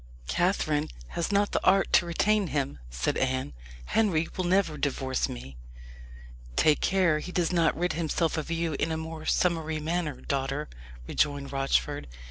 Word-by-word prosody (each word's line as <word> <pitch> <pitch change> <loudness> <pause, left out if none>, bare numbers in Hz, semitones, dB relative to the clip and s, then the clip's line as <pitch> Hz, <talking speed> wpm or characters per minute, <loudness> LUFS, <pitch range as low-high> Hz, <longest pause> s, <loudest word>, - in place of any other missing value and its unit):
"Catherine 155 - +1 0.2
has 170 +3 -2
not 205 0 +2
the - - 0
art 195 +1 +3
to 175 - +5
retain 210 +4 +2
him," 135 - -2
said - - -1
Anne. 130 - -1 0.3
"Henry 170 - +2
will 185 - -1
never 180 -3 +2
divorce 135 -2 -1
me." 65 +1 -8 1.0
"Take 155 - +4
care 180 -5 +3
he 180 - -7
does 180 -1 0
not 170 -2 +3
rid 175 0 0
himself 165 0 0
of 155 -1 -3
you 165 -1 -1
in 160 - 0
a 160 - -1
more 160 0 -6
summary 160 -3 +1
manner, 160 -1 -2
daughter," 140 +2 -2 0.4
rejoined 145 -2 0
Rochford. 135 - 0
160 Hz, 155 wpm, -28 LUFS, 140-175 Hz, 1.0 s, to